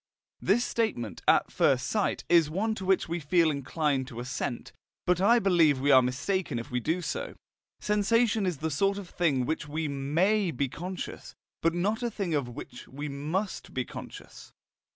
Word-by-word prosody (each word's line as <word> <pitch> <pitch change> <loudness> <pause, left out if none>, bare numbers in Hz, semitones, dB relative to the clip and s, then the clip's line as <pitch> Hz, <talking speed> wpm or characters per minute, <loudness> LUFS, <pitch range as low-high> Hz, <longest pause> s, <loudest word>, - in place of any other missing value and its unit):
This 230 +6 +2
statement, 120 - -2
at - - +4
first 130 -2 +2
sight, 210 -3 0
is 170 -3 +5
one 210 +7 0
to 195 -3 -6
which 190 0 +2
we 170 +1 -2
feel 165 +1 +3
inclined 140 -1 -1
to 120 -3 -8
assent, 125 -1 -4 0.3
but 180 0 +2
I 230 +5 +6
believe 170 - +4
we 140 +2 +2
are 130 -1 +8
mistaken 145 +4 -1
if 115 +1 -6
we 125 - 0
do 165 +8 -1
so. - - -4 0.4
Sensation 210 0 +2
is 175 -5 -1
the 160 +3 -3
sort 195 +7 +1
of 200 -3 -7
thing 150 -7 +1
of - - -4
which 160 -1 -2
we 155 +2 -2
MAY 170 +9 +1
be 140 -2 -1
conscious, 180 +6 -7 0.3
but 165 +1 +2
not 205 +6 0
a 240 - 0
thing 200 -6 -3
of 140 -5 0
which 120 0 -9
we 145 +3 -6
MUST 155 +9 -3
be 125 -1 -1
conscious. - - -10
165 Hz, 185 wpm, -28 LUFS, 140-195 Hz, 0.4 s, are